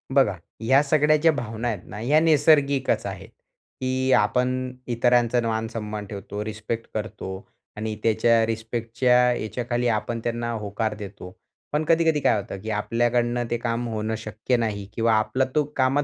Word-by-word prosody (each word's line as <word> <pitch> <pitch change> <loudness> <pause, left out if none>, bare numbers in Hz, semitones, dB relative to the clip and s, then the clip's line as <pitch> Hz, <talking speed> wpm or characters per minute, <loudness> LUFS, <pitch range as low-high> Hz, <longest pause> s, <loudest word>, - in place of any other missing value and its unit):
बघा, 120 -8 +4 0.3
ह्या 130 +5 +5
सगळ्या 150 +1 +3
ज्या 165 +2 +4
भावना 115 -4 -4
आहेत 110 -5 -1
ना, 105 - -7
या 145 +7 +4
नैसर्गिकचं 145 -3 +3
आहेत, - - -9 0.5
की 130 0 0
आपण 125 0 0 0.2
इतरांचा 120 0 +3
मान-सन्मान 110 -2 -3
ठेवतो, 105 +1 -6
रिस्पेक्ट 110 +1 -4
करतो 100 -3 -5 0.3
आणि 110 0 -3
त्याच्या 115 +1 +3
रिस्पेक्टच्या 115 +2 0 0.2
याच्याखाली 120 +3 -2
आपण 115 +1 -1
त्यांना 120 0 -2
होकार 110 0 -2
देतो. 100 -2 -8 0.4
पण 150 +1 +1
कधी-कधी 165 -2 +3
काय - - +3
होतं? 95 0 -7
की 110 - -6
आपल्याकडनं 120 +2 0
ते 120 - +1
काम 120 0 -2
होणं 110 0 -2
शक्य 110 +3 -2
नाही 105 -4 -2
किंवा 115 0 +2
आपला 110 +5 +2
तो 150 - +4
कामात 135 +2 +3
115 Hz, 150 wpm, -24 LUFS, 110-130 Hz, 0.5 s, ह्या